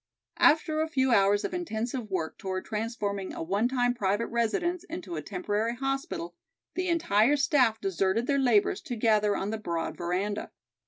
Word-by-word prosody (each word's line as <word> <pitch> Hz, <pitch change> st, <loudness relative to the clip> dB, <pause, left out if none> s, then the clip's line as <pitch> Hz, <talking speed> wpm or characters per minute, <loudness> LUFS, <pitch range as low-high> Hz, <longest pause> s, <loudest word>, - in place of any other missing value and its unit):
After 310 Hz, 0 st, +4 dB
a 315 Hz, -, 0 dB
few 265 Hz, -4 st, +1 dB
hours 205 Hz, -1 st, +4 dB
of -, -, -4 dB
intensive 240 Hz, -8 st, -3 dB
work 170 Hz, -4 st, -3 dB
toward 185 Hz, -1 st, -4 dB
transforming 210 Hz, -3 st, -3 dB
a -, -, -4 dB
one 200 Hz, +7 st, +1 dB
time 245 Hz, -1 st, +1 dB
private 205 Hz, 0 st, 0 dB
residence 335 Hz, +10 st, 0 dB
into 335 Hz, -, -6 dB
a 155 Hz, -, -3 dB
temporary 205 Hz, +7 st, -2 dB
hospital, 270 Hz, -9 st, -3 dB, 0.4 s
the 370 Hz, 0 st, -1 dB
entire 295 Hz, -6 st, +3 dB
staff 260 Hz, -6 st, +3 dB
deserted 195 Hz, +3 st, 0 dB
their 280 Hz, 0 st, +1 dB
labors 235 Hz, -6 st, +3 dB
to 245 Hz, -, -5 dB
gather 215 Hz, -2 st, +2 dB
on 200 Hz, +2 st, -2 dB
the 220 Hz, -, -3 dB
broad 170 Hz, -5 st, -3 dB
veranda. 185 Hz, +4 st, -2 dB
220 Hz, 165 wpm, -28 LUFS, 200-270 Hz, 0.4 s, After